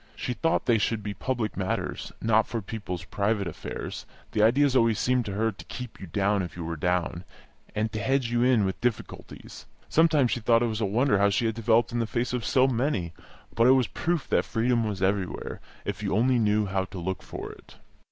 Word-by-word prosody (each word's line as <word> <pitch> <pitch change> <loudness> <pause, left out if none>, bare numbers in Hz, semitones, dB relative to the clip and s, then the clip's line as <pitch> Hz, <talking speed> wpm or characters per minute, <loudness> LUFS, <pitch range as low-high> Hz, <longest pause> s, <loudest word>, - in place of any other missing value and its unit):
She 125 - -3
thought 165 +6 0
they 115 -3 +3
should 110 +1 -1
be 105 0 -3
for 95 - -17
public 120 -5 -1
matters, 95 -1 -3
not 110 -1 +3
for 115 - -3
people's 100 -4 -6
private 100 0 -1
affairs; 85 - -6 0.2
the 105 - +1
idea 135 +7 +5
always 115 -4 +4
seemed 125 -1 +1
to 100 - -4
her 110 +3 +1
to 100 - -13
keep 125 -2 -8
you 95 - -7
down 100 +3 +1
if 90 -1 -6
you 85 - -5
were 85 0 -3
down, 90 +1 -1 0.5
and 110 +1 0
to 110 - -3
hedge 130 +1 0
you 120 0 +1
in 125 -4 +4
with 95 - -3
difficulties. 120 -2 -5 0.2
Sometimes 155 -6 +4
she - - 0
thought 115 +1 +3
it 115 -2 0
was 110 - -3
a - - +2
wonder 110 +1 +2
how 100 0 +4
she 100 +4 +1
had 110 - +1
developed 115 +1 +2
in 120 - -1
the 115 - 0
face 120 +2 -2
of 125 -2 -1
so 130 +3 +3
many; 120 - -1 0.4
but 115 +1 +4
it 130 - +8
was 130 - +2
a - - -10
proof 170 -3 -1
that - - +3
freedom 115 0 +1
was 100 -3 -3
everywhere, 95 -1 -1 0.2
if 100 0 -4
you 100 -2 -1
only 125 +3 +3
knew 105 -1 +2
how 95 -1 -1
to 95 +1 -10
look 95 +2 -3
for - - -7
it. - - -16
110 Hz, 230 wpm, -27 LUFS, 100-120 Hz, 0.5 s, it